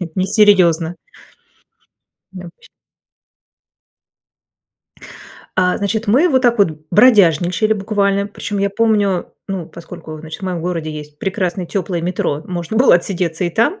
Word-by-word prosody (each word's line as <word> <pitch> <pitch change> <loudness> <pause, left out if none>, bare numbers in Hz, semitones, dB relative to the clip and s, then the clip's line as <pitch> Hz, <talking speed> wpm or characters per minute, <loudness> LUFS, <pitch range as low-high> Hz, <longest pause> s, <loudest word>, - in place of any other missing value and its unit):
Несерьезно". 185 -4 +3 1.4
Необычно. 180 -2 -12 2.9
А, 180 -1 +2
значит, 215 +3 -2
мы 265 +12 +4
вот 260 -5 +2
так 240 -2 +2
вот 165 -7 +2
бродяжничали, 205 - +4
буквально, 200 -1 0
причём 205 0 -5
я 200 0 0
помню, 205 -3 0 0.2
ну, 190 -4 -4
поскольку, 165 -1 -10
значит, 155 +3 -9
в - - -4
моем 180 -2 -3
городе 165 -2 -3
есть 150 -1 -9
прекрасное 185 -1 -2
тёплое 180 -1 -3
метро, 165 -4 -2
можно 175 +3 -4
было 250 -3 +6
отсидеться 175 -1 -1
и 175 - -1
там. 230 - 0
185 Hz, 120 wpm, -17 LUFS, 170-205 Hz, 2.9 s, было